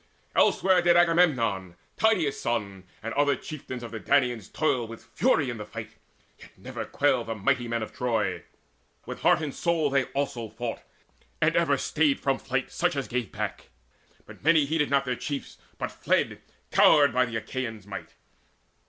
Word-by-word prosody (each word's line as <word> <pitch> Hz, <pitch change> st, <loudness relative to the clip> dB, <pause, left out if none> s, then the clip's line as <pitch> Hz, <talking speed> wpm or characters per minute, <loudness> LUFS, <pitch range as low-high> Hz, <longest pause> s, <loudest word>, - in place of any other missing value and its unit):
Elsewhere 185 Hz, -2 st, +4 dB
did 175 Hz, 0 st, +5 dB
Agamemnon, 125 Hz, -, +2 dB, 0.2 s
Tydeus' 185 Hz, -11 st, +2 dB
son, 100 Hz, -5 st, -2 dB, 0.2 s
And 115 Hz, -, -4 dB
other 145 Hz, -1 st, +3 dB
chieftains 130 Hz, -3 st, -7 dB
of 115 Hz, -, -7 dB
the 115 Hz, -, -5 dB
Danaans 125 Hz, -6 st, +1 dB
toil 130 Hz, -6 st, 0 dB
With 115 Hz, 0 st, -10 dB
fury 155 Hz, -, +1 dB
in 120 Hz, -, -6 dB
the 105 Hz, -, -5 dB
fight. 110 Hz, 0 st, -7 dB, 0.5 s
Yet -, -, -14 dB
never -, -, -6 dB
quailed 130 Hz, -5 st, +1 dB
The 115 Hz, -, -3 dB
mighty 120 Hz, +4 st, 0 dB
men 115 Hz, -1 st, -1 dB
of -, -, -8 dB
Troy: 110 Hz, -7 st, -1 dB, 0.6 s
with -, -, -7 dB
heart -, -, +4 dB
and 145 Hz, -3 st, -3 dB
soul 165 Hz, -4 st, 0 dB
They 135 Hz, -2 st, +2 dB
also 135 Hz, -5 st, -3 dB
fought, 115 Hz, +2 st, -5 dB, 0.6 s
and -, -, +2 dB
ever -, -, +3 dB
stayed 150 Hz, -2 st, +1 dB
from 135 Hz, -1 st, 0 dB
flight 135 Hz, 0 st, -2 dB
Such -, -, 0 dB
as 140 Hz, -2 st, -2 dB
gave 125 Hz, -5 st, -3 dB
back. -, -, -5 dB, 0.6 s
Yet -, -, -14 dB
many 160 Hz, -1 st, +5 dB
heeded 150 Hz, 0 st, 0 dB
not 140 Hz, 0 st, +2 dB
Their 125 Hz, -1 st, -1 dB
chiefs, 140 Hz, +1 st, -5 dB, 0.2 s
but -, -, -3 dB
fled, -, -, 0 dB, 0.3 s
cowed 145 Hz, -2 st, +6 dB
by 125 Hz, 0 st, +3 dB
the 115 Hz, -2 st, -6 dB
Achaeans' 115 Hz, -2 st, -4 dB
might. 100 Hz, -1 st, -8 dB
130 Hz, 170 wpm, -27 LUFS, 115-145 Hz, 0.6 s, cowed